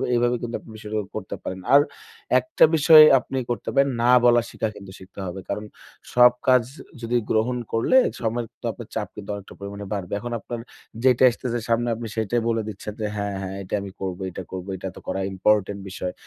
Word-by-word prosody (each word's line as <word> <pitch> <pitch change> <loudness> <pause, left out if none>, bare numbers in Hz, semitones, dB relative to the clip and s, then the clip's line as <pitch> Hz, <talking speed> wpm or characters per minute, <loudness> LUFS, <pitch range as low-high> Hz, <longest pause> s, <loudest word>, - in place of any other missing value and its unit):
এইভাবে 120 +1 +2
কিন্তু 120 0 -4
আপনি - - -17
বিষয়টা 110 0 -5 0.2
করতে 110 -3 -5
পারেন। 95 - -5
আর 140 - +9 0.6
একটা 320 - +1
বিষয় 155 0 +9 0.2
আপনি 135 - -6
করতে 120 -4 -3
পারেন 140 0 +4
না 120 +1 +4
বলার 120 -1 +5
শিখা 110 - -2
কিন্তু 100 -2 -11
শিখতে 95 +1 -13
হবে। 90 +1 -5
কারণ 105 +1 -3 0.5
সব 125 0 +7 0.2
কাজ 130 -2 +6 0.4
যদি 120 +1 0
গ্রহণ 115 +3 +1
করলে 115 - +3 0.2
সময়ের 115 0 -1
তো - - -8
আপনার - - -10
চাপ - - -2
কিন্তু 100 -1 -9
অনেকটা 100 -1 -10
পরিমাণে 100 0 -7
বাড়বে। 100 -3 -3
এখন 120 +3 -5
আপনার 120 +3 -6 0.4
যেটা 130 -1 +4
আসতেছে 120 0 -3
সামনে 115 +1 +2
আপনি 115 +1 -6
সেটাই 115 +2 0
বলে 115 -1 +1
দিচ্ছেন 105 +1 -7
যে - - 0
হ্যাঁ, 100 -1 -3
হ্যাঁ 95 0 -5
এটাই 95 - -2
আমি 100 -1 -7
করব। 95 -2 -3
এটা 95 +1 -7
করবো, 95 +1 -6
এটা 95 - -6
তো - - -9
করা 95 - -2
ইম্পোর্টেন্ট 100 +1 +1
বিষয়। 90 -1 -4
110 Hz, 200 wpm, -24 LUFS, 100-120 Hz, 0.6 s, আর